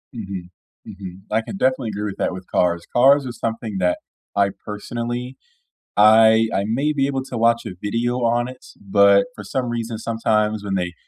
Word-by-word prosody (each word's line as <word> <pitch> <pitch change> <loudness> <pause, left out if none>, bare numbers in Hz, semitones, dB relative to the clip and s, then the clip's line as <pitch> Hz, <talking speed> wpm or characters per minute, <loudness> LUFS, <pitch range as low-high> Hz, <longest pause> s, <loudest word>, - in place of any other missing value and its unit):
Mhm, 95 -5 -6 0.4
mhm. 95 -1 -9
I 110 +1 +2
can 195 - -7
definitely 130 - +1
agree 105 0 -4
with 100 -2 -5
that - - -1
with 95 0 -9
cars. 85 -1 +1
Cars 135 +3 +5
are 125 - -4
something 115 -3 -4
that 90 -1 +1 0.4
I, 100 0 +3 0.2
personally 120 +4 -5 0.6
I 110 +1 +6
I 100 - +1
may 135 +8 0
be 135 -2 +1
able 135 -1 -2
to 125 - -6
watch 115 +1 +2
a 90 - -6
video 115 +4 -1
on 120 +1 +1
it, 130 0 -11
but 100 0 +4
for - - -8
some 130 -2 -2
reason, 115 -1 -3
sometimes, 110 -2 0
when 100 -1 -2
they 90 -2 -2
110 Hz, 185 wpm, -21 LUFS, 100-120 Hz, 0.6 s, I